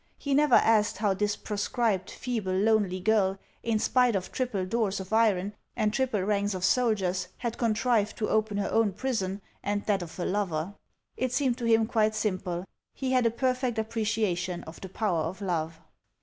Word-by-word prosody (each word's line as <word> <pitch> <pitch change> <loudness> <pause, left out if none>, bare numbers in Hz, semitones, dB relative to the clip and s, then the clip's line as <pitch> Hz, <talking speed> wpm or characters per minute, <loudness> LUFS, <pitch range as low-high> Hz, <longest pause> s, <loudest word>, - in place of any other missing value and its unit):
He 280 - -2
never 290 -2 +5
asked 220 -1 +4
how 205 -2 +2
this 205 +2 0
proscribed, 210 -1 -1
feeble, 220 -7 -3
lonely 205 -3 +2
girl, 195 -1 +2 0.2
in 225 -2 0
spite 245 +1 +3
of 185 -1 -3
triple 230 -8 -1
doors 205 0 0
of 190 +2 -7
iron 210 -3 +2 0.2
and 210 0 +1
triple 245 -6 0
ranks 205 0 0
of 185 0 -1
soldiers, 190 -8 +1
had 235 -1 -4
contrived 225 -2 +1
to 215 - -1
open 215 -1 +1
her 205 - -1
own 225 -3 +2
prison 200 -5 -2 0.2
and 205 0 -2
that 205 -3 +1
of 170 -2 -8
her 180 - -2
lover; 185 -3 -1 0.4
it 255 -1 -1
seemed 260 -3 +1
to 240 - -3
him 225 -1 +4
quite 220 -1 +1
simple; 185 -4 -2 0.3
he 265 -1 -2
had 250 -2 +4
a - - +4
perfect 255 0 -1
appreciation 215 -5 -1
of 160 - -11
the 190 - -7
power 190 -4 0
of 165 +5 -4
love. 165 -4 -2
210 Hz, 180 wpm, -28 LUFS, 190-230 Hz, 0.4 s, never